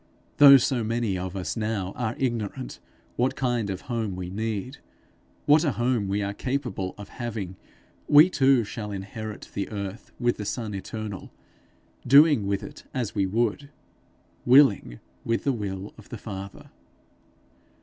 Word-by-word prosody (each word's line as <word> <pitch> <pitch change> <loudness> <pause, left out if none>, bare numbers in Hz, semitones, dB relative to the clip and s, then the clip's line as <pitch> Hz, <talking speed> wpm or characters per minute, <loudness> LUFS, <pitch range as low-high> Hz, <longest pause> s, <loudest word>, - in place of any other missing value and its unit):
Though 140 -1 +10
so 125 -2 0
many 115 -2 -1
of 90 +1 -4
us 95 -2 -3
now 105 -4 -2
are 120 -2 -2
ignorant 115 - -3 0.4
what 125 +2 +1
kind 120 -5 -1
of 95 -1 -4
home 115 -6 -3
we 90 -1 -6
need, 110 +5 -4 0.7
what 150 +2 +5
a 145 -6 +1
home 120 -4 0
we 100 +1 -1
are 100 0 -3
capable 120 -7 -3
of 105 -1 -10
having, 110 -7 -5 0.5
we 150 +3 +8
too 135 -8 +3
shall 105 0 -6
inherit 105 +2 -7
the 100 - -3
earth 100 +1 -6
with 120 -1 +1
the 105 - -5
Son 110 0 -3
eternal, 100 0 -6 0.8
doing 140 -5 +6
with 100 -1 -1
it 145 - -10
as 120 -5 -2
we 100 -2 +1
would 115 +7 -1 0.7
willing 120 - +4 0.2
with 115 0 -1
the 140 - +1
will 100 -3 -5
of 105 - -15
the 120 - -6
Father. 100 -2 -8
110 Hz, 150 wpm, -26 LUFS, 100-125 Hz, 0.8 s, Though